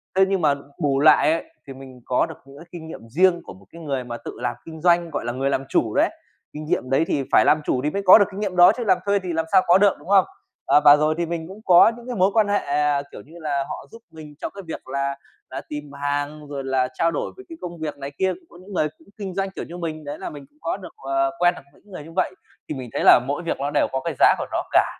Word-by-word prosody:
Thế 190 - +5
nhưng 195 -1 0
mà 145 -3 +3 0.3
bù 140 -2 +1
lại 155 +1 +5
ấy 165 - -1 0.2
thì 135 - -7
mình 130 -2 -13
có 125 - +1
được - - -9
những 140 +1 -15
cái 165 - -12
kinh 165 -2 -9
nghiệm 115 -8 -10
riêng 175 +5 +3
của - - -10
một 95 +1 -18
cái 170 - -12
người 135 -4 -3
mà 120 -1 -6
tự - - -8
làm - - -2
kinh 160 -1 -10
doanh, 170 -1 +3
gọi 145 - -4
là, 120 - -1
người 135 +2 -1
làm 135 -1 -1
chủ - - +1
đấy, - - +3 0.4
kinh 150 +1 -7
nghiệm 130 -4 -1
đấy 135 +5 +2
thì 140 - 0
phải - - +5
làm 155 - +4
chủ 125 - 0
thì 150 - +1
mới 200 +6 -3
có 185 - +10
được 205 - +4
kinh 195 - -7
nghiệm 200 -3 -3
đó 175 +2 +8
chứ 240 - -2
làm 185 - +4
thuê 200 0 +2
thì 180 -3 -5
làm 160 0 -1
sao 190 - +6
có 175 +2 +7
được, 200 -1 +4
đúng - - -16
không? 195 -2 +5 0.4
Ờ, 150 - +4
và 145 0 +10
rồi 155 +1 +1
thì 170 - 0
mình 165 -1 -4
cũng 195 +4 -11
có 180 +4 +7
những 240 0 -13
cái 245 - -4
mối 190 +1 +3
quan 220 -2 +3
hệ, 205 0 +2
à, 145 -3 0
kiểu - - -10
như 160 - -18
là, 145 -3 -1
họ - - -7
giúp 230 - -13
mình 155 -2 -12
trong - - -4
cái 200 - -7
việc 160 - -7
là 140 +1 -2 0.4
là 135 +1 -5
tìm 150 -1 -7
hàng 145 +1 -3
rồi 140 -1 -5
là 130 -1 0
trao 165 +1 +1
đổi 150 - -3
với 385 - -12
cái 330 - -9
công 175 -1 -7
việc 155 -2 -5
này 140 0 -7
kia. 190 0 +2
Cũng 360 - -15
có - - -16
những 195 +2 -12
người 155 -4 +1
cũng - - -23
kinh 195 -3 -5
doanh 195 0 -1
kiểu - - -6
như 175 - -9
mình 160 -2 -5
đấy 145 +1 -7
là - - -5
mình 145 -2 -10
cũng 145 - -34
có 165 - -2
được, 190 - -11
ờ, 135 0 0
quen 175 0 +4
được - - -11
những 205 - -23
người 180 - -8
như 160 - -12
vậy. 185 0 0 0.4
Thì 150 - -3
mình 130 -2 -7
thấy - - -1
là - - +8
mỗi 145 +5 -2
việc 165 - -3
ló 145 +1 -1
đều - - +2
có 135 0 -2
cái 170 - -1
giá - - +6
của - - -2
nó - - -1
cả, - - +5
155 Hz, 305 wpm, -22 LUFS, 140-185 Hz, 0.4 s, có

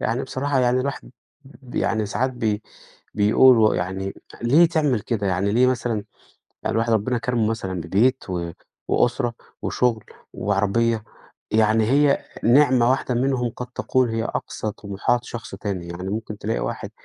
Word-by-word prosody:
يعني 115 +4 -1
بصراحة 135 +1 -1
يعني 125 0 +3
الواحد 140 0 -4 0.3
ب 130 -2 -15
يعني 110 -2 0
ساعات 120 +6 -1
بي 110 -4 -2 0.5
بيقول 115 +4 +6
و 110 -1 +4
يعني 95 +2 -3 0.3
ليه 145 +9 +6
تعمل 150 -8 +1
كده، 105 -2 -2
يعني 95 +2 0
ليه 125 +3 +4
مثلًا 120 -4 -1 0.6
يعني - - -1
الواحد 115 +1 +1
ربنا 115 +3 +1
كرمه 120 -3 0
مثلًا 95 -5 -3
ببيت 105 +8 +1
و 85 -2 -3 0.4
وأسرة 120 -1 +1 0.3
وشغل 120 -3 0 0.3
وعربية 105 +3 0 0.5
يعني 110 0 +3
هي 140 +3 +3 0.2
نعمة 125 -1 +5
واحدة 130 -1 0
منهم 125 -1 0
قد 125 - -7
تكون 130 -1 +1
هي 115 0 -1
أقصى 110 -2 -4
طموحات 105 +5 -1
شخص 120 -5 -7
تاني، 95 -3 -4
يعني 90 +2 -6
ممكن 105 0 -4
تلاقي - - -2
واحد - - -4
115 Hz, 150 wpm, -23 LUFS, 105-125 Hz, 0.6 s, بيقول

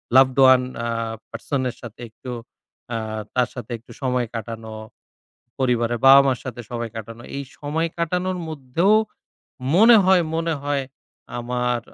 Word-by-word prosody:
Loved 130 0 +6
one 130 -1 +7 0.2
আ - - -1 0.4
person 130 +4 -3
এর - - -8
সাথে 120 -1 -10
একটু, 125 +3 -9 0.6
আ - - 0 0.4
তার 125 -1 +2
সাথে 120 -2 -7
একটু 115 - -18
সময় 125 -2 0
কাটানো। 110 0 -6 0.9
পরিবারে 120 -2 +1
বাবা 135 +1 +10
মার 130 -2 +1
সাথে 120 -2 -6
সময় 120 -1 -4
কাটানো। 115 +1 -8
এই 140 - -3 0.2
সময় 155 +3 -1
কাটানোর 180 +2 -1
মধ্যেও 155 +7 +1 0.8
মনে 225 +4 +8
হয় 185 -1 +5
মনে 165 0 0
হয় 145 -2 -1 0.5
আমার 125 0 -1
130 Hz, 140 wpm, -22 LUFS, 120-150 Hz, 0.9 s, বাবা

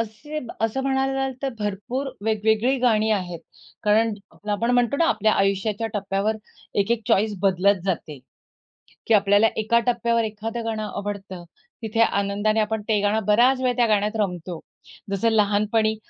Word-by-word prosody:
असे 230 +8 -5 0.2
असं 225 +4 0
म्हणायला 270 0 0
जाल, 270 0 -1
तर 275 - 0
भरपूर 215 +7 -3 0.2
वेगवेगळी 220 +4 +2
गाणी 220 -3 +2
आहेत 180 -4 -3 0.4
कारण 215 +2 +3 0.4
आपण 230 +4 0
म्हणतो 245 +2 +2
ना 335 - +3
आपल्या 215 0 +2
आयुष्याच्या 200 +3 0
टप्प्यावर 200 +2 -1 0.4
एक-एक 230 +3 0
चॉईस 210 +1 +2
बदलत 195 0 +2
जाते 160 -6 -3 0.9
की 230 - +3
आपल्याला 205 +1 +5
एका 220 +2 +2
टप्प्यावर 235 -1 +1
एखादं 225 +2 -4
गाणं 220 -1 -2
आवडतं, 200 -3 -6 0.4
तिथे 225 0 -3
आनंदाने 205 +1 +1
आपण 215 0 0
ते 215 -2 +3
गाणं 210 +1 +1
बराच 245 +6 +4
वेळ 250 -1 +1
त्या 240 -2 +3
गाण्यात 210 +1 +1
रमतो. 180 -4 -3 0.5
जसं 200 +4 +1
लहानपणी 215 +1 +2
215 Hz, 145 wpm, -23 LUFS, 205-230 Hz, 0.9 s, आपल्याला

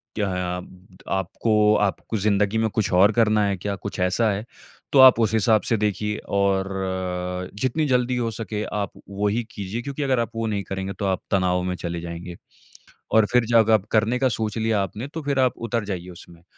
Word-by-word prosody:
क्या 105 -2 0 0.3
अब 90 +1 -12
त - - -21
आपको 105 +3 +2
आपको 105 +2 -1
ज़िंदगी 105 +1 +1
में 110 0 +1
कुछ 105 -2 -1
और 95 +4 +6
करना 110 -1 +3
है 100 -1 0
क्या 100 +2 -3
कुछ 100 0 -7
ऐसा 90 +5 +2
है? 100 +2 -3 0.5
तो 140 - +4
आप 130 -3 +9
उस 110 -1 +2
हिसाब 110 0 +3
से 115 - +2
देखिए। 105 0 -1
और 100 -1 +1 0.9
जितनी 130 +5 +1
जल्दी 125 -1 +1
हो 115 -2 -1
सके 110 -1 -4
आप 100 -2 -2 0.2
वहीं 105 +4 -1
कीजिए 105 +1 -5
क्योंकि 140 +3 -4
अगर 130 -3 +1
आप 115 -2 -2
वो 115 0 -1
नहीं 100 -2 -2
करेंगे 95 0 -4
तो 100 - -1
आप 95 -1 0
तनाव 90 -2 +2
में 90 0 -2
चले 85 -1 -5
जाएँगे। 85 +1 -7 0.8
और 110 -1 +5
फ़िर 125 -1 +4
जग 115 -2 +4
आप 110 -2 +3
करने 115 +3 +2
का 130 0 +2
सोच 110 -2 -2
लिया 110 -2 +1
आपने 105 +6 -5
तो 160 - -4
फ़िर 140 -1 -1
आप 130 -1 +3 0.2
उतर 115 -2 -1
जाइए 90 -3 -5
उसमें। 85 -1 -14
105 Hz, 205 wpm, -23 LUFS, 95-115 Hz, 0.9 s, आप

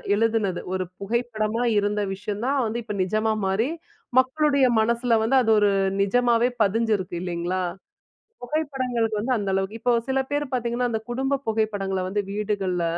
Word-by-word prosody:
எழுதினது. 220 -4 +1
ஒரு 185 - 0 0.2
புகைப்படமா 225 +1 -1
இருந்த 205 0 +1
விஷயம் 210 +2 -5
தான், 275 +1 +1
வந்து 225 +2 -2
இப்போ 220 -2 -5
நிஜமா 215 +3 0
மாறி, 205 +7 +1 0.5
மக்களுடைய 280 +1 +3
மனசுல 235 +2 +1
வந்து, 245 +4 +2
அது 230 - 0
ஒரு 205 - +4 0.3
நிஜமாவே 240 +3 +3
பதிஞ்சிருக்கு 210 -3 0
இல்லைங்களா? 180 +1 -2 0.8
புகைப்படங்களுக்கு 250 -6 -1
வந்து 250 +3 0
அந்த 200 -2 -2
அளவுக்கு, 195 +4 -2
இப்ப 245 +1 +2 0.2
சில 265 0 +2
பேரு 290 0 0
பார்த்தீங்கன்னா, 245 0 0
அந்த 220 - -1
குடும்ப 270 +2 0
புகைப்படங்கள 205 -3 0
வந்து 205 +2 -1
வீடுகள்ல. 200 -4 -1
225 Hz, 145 wpm, -24 LUFS, 205-245 Hz, 0.8 s, ஒரு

